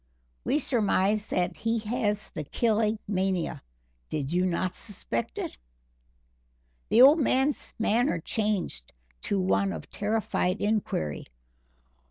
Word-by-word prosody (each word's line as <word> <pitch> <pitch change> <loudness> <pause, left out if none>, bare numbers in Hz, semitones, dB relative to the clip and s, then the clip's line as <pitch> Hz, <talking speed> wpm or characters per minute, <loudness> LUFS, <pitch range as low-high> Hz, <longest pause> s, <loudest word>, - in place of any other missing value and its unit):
We 285 - +2
surmise 215 -6 +1
that 180 0 -1
he 225 +1 0
has 215 -1 -2
the 155 - -4
killing 220 - +1
mania. 190 -3 -1 0.5
Did 145 +1 -2
you 180 +1 +2
not 180 +1 -1
suspect 150 - -4
it?" 65 - -5 1.3
The 240 - +7
old 290 +5 +8
man's 270 +1 +1
manner 225 - +2
changed 200 - -1 0.3
to 200 - +1
one 190 +1 +2
of - - -7
terrified 210 -3 0
inquiry. 205 - -1
205 Hz, 115 wpm, -28 LUFS, 185-225 Hz, 1.3 s, old